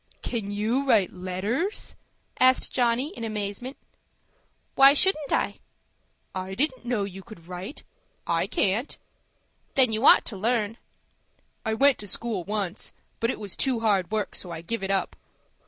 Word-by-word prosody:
"Can 220 -4 -3
you 225 +7 0
write 215 -8 +4
letters?" 195 - -2 0.5
asked 255 0 +4
Johnny, 245 +3 +2
in - - -6
amazement. 215 +4 -4 1.0
"Why 275 +1 +7
shouldn't 305 -3 +2
I?" - - 0 0.7
"I 190 0 -4
didn't 260 0 -1
know 240 -4 0
you 195 -1 -6
could 190 -5 -14
write. 180 - -7 0.4
I - - +1
can't." 225 - 0 0.8
"Then 255 -4 +5
you 220 +3 -1
ought - - +8
to 220 - -5
learn." 225 +1 0 0.9
"I 220 -1 0
went 275 +3 +4
to 205 - -8
school 215 -1 -2
once; 200 -1 -3 0.3
but 230 - +1
it - - -2
was 205 -3 -5
too 255 -4 0
hard 200 -5 +2
work, 215 -1 -2
so 180 - -5
I 165 -1 -6
give 230 +6 -3
it 195 - -3
up." 195 -2 0
220 Hz, 155 wpm, -26 LUFS, 195-250 Hz, 1.0 s, ought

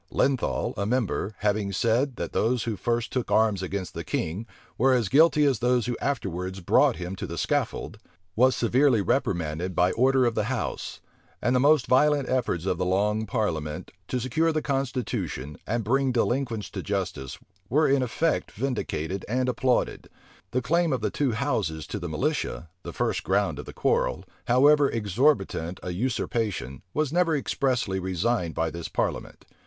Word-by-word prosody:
Lenthal, 135 -3 0
a 100 - -1
member, 110 -3 -1
having 105 -1 0
said, 120 +6 +1
that - - -5
those 120 +1 +1
who 115 -2 -2
first 115 +2 -1
took 125 -2 -1
arms 110 -4 +3
against 95 0 -4
the - - -5
king 95 +9 -3 0.3
were 130 +1 +3
as 120 -6 +1
guilty 150 - +5
as 135 -6 +2
those 125 -1 +2
who 120 - -1
afterwards 95 -8 -2
brought 85 - +3
him 90 +1 -5
to - - -5
the 85 - -6
scaffold, - - -1 0.4
was 130 +3 +4
severely 125 +1 +3
reprimanded 85 +1 -1
by 90 +2 +3
order 130 +1 +3
of 120 - +1
the 110 -2 0
house; 120 -2 -4 0.4
and 120 +1 +1
the - - +4
most 145 0 +4
violent 145 +1 +3
efforts 120 -9 -1
of 90 -2 -1
the - - +1
long 105 +4 +1
parliament, 80 -10 -2 0.2
to 125 - -1
secure 140 +7 +1
the 155 - 0
constitution, 120 - -2
and 115 +2 -1
bring 135 +3 +2
delinquents 120 -2 -1
to - - -4
justice, 90 -10 -3 0.3
were 150 +5 +3
in 135 0 +3
effect 150 +6 0
vindicated 100 - -3
and 125 +2 0
applauded.[*] 125 0 0 0.4
The 125 +4 -1
claim 170 0 +2
of 125 - -1
the 105 - -1
two 135 -5 0
houses 80 - -1
to 105 - -5
the 85 -2 -5
militia, 85 - -2
the - - -7
first - - -1
ground - - +1
of - - -6
the - - -8
quarrel, - - 0 0.2
however 140 +4 +5
exorbitant 105 - 0
a 90 - -3
usurpation, 105 - -2
was 155 - -1
never 175 -2 +3
expressly 125 -8 0
resigned 95 0 -1
by 80 0 0
this 85 0 -5
parliament. - - -3
115 Hz, 170 wpm, -26 LUFS, 95-130 Hz, 0.4 s, guilty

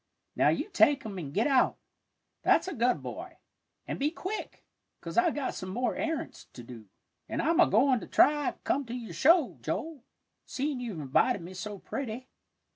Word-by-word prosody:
"Now - - +4
you - - 0
take 290 - +3
'em 200 -4 -5
and 145 -5 -6
git 210 +10 +1
out, 270 -3 +3 0.6
that's - - +3
a 375 - -3
good 245 -2 +1
boy, - - -7 0.5
an' - - -4
be 285 +2 +2
quick, 375 +6 -6 0.3
'cause - - -7
I've 355 -2 +3
got 285 -3 -2
some 185 - -6
more 245 +6 -1
arrants 320 -2 -4
to 120 - -10
do, 115 -3 -11 0.4
an' - - -3
I'm 330 +2 +2
a - - +7
goin' 260 -2 +4
to - - -9
try 295 -1 +4
to - - -10
come 280 - 0
to 235 - -5
your 235 -3 -7
show, 330 -4 +4
Joel, 315 -6 -4 0.4
seein' 280 0 -2
you've 225 -9 -5
invited 165 - +2
me 180 +2 -9
so 200 +3 -6
pretty." 255 +3 -5
255 Hz, 190 wpm, -29 LUFS, 205-295 Hz, 0.6 s, a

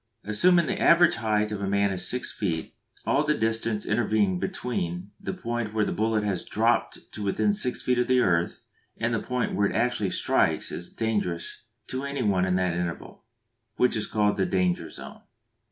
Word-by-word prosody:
Assuming 170 - +4
the - - -2
average 170 0 +5
height 105 -2 0
of 105 -1 -4
a 100 - -1
man 100 0 +2
to - - -2
be - - -4
six 120 +8 0
feet, 80 -6 -3 0.3
all 145 - +2
the 150 0 +1
distance 110 -1 -1
intervening 105 -5 +1
between 90 -6 -3
the - - -4
point 120 - -4
where 105 -1 +2
a - - -1
bullet 110 0 0
has 100 -3 -1
dropped 115 +3 0
to - - -6
within 105 - +1
six 130 - -1
feet 125 -1 +1
of 125 - +1
the 130 0 +4
earth, 85 -7 +1 0.4
and 115 +1 -1
the 115 - 0
point 125 0 -2
where 100 0 +2
it - - -5
actually 115 -3 +1
strikes - - +1
is 85 - -5
dangerous 105 -5 -2 0.2
to 130 +2 -4
any 140 -1 -2
one 95 -3 +2
in 90 -1 +1
that 90 -2 +1
interval, 90 +3 -5 0.5
which 125 - +2
is 110 - -1
called 105 -2 +1
the 95 - +2
"danger 90 -2 0
zone." - - -10
105 Hz, 195 wpm, -26 LUFS, 95-120 Hz, 0.5 s, average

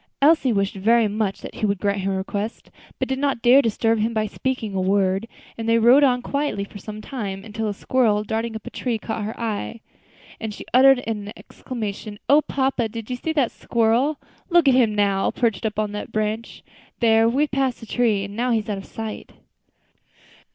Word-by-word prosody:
Elsie 285 -3 +4
wished 200 -2 0
very 220 +3 +3
much 205 -1 -2
that - - -8
he - - -9
would 200 0 0
grant 200 +1 -1
her 195 +1 -1
request, 200 +3 -4 0.3
but - - -1
did 265 0 -2
not 275 -4 -1
dare 250 +3 +7
to - - +6
disturb 225 +1 +1
him 225 +2 0
by 215 0 +1
speaking 225 -1 -3
a 190 - 0
word; 195 +2 +1 0.3
and 225 0 -2
they 230 - +4
rode 245 +5 +6
on 250 -3 +3
quietly 280 -8 -1
for 205 +1 -10
some 215 +2 -8
time, 200 -7 -5
until 220 0 -3
a 205 - -1
squirrel 215 -3 +1
darting 220 +1 -3
up 220 - -7
a - - -7
tree 240 -3 -2
caught 220 0 -4
her 215 +2 -5
eye, 230 0 -3 0.6
and 220 -2 -5
she - - -9
uttered 260 0 +6
an 210 -2 -4
exclamation. 215 -3 -6
"O 290 +2 +6
papa! 265 -5 -1
did 225 +2 -7
you - - -1
see 320 +6 -3
that 275 -7 +1
squirrel? 235 +6 +1 0.3
look 345 -4 +4
at 270 - +6
him 235 -5 +3
now, 200 -2 +2
perched 225 -3 0
up 215 - -6
on 215 -1 -1
that 210 0 -6
branch. 215 +1 -3 0.4
There, 225 -1 +4
we 270 +5 +2
have 300 - -2
passed 265 -2 0
the - - -10
tree, 220 -3 +1
and 200 +1 -7
now 245 +3 0
he 235 - +3
is 220 0 -4
out 200 -2 -2
of 195 - -10
sight." 220 -1 -7
225 Hz, 215 wpm, -22 LUFS, 210-250 Hz, 0.6 s, dare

